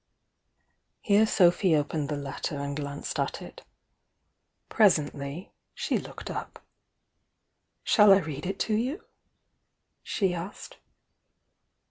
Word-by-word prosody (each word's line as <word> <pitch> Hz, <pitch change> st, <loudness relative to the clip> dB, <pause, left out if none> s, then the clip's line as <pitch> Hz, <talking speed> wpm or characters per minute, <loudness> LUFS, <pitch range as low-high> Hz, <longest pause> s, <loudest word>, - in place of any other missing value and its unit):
Here 210 Hz, +1 st, +4 dB
Sophy 175 Hz, -3 st, +4 dB
opened 150 Hz, 0 st, -1 dB
the 150 Hz, -, -1 dB
letter 140 Hz, +1 st, -4 dB
and 140 Hz, 0 st, -4 dB
glanced 145 Hz, -1 st, -5 dB
at -, -, -1 dB
it. -, -, -11 dB, 1.1 s
Presently 150 Hz, -5 st, +1 dB, 0.2 s
she -, -, -1 dB
looked -, -, -8 dB
up. -, -, -7 dB, 1.2 s
"Shall 210 Hz, -3 st, +6 dB
I 195 Hz, -, +8 dB
read 155 Hz, -3 st, -4 dB
it 195 Hz, +1 st, -3 dB
to 220 Hz, -, 0 dB
you?" 255 Hz, -, -2 dB, 1.0 s
she 190 Hz, -4 st, -1 dB
asked. 175 Hz, +3 st, -8 dB
170 Hz, 105 wpm, -27 LUFS, 145-200 Hz, 1.2 s, I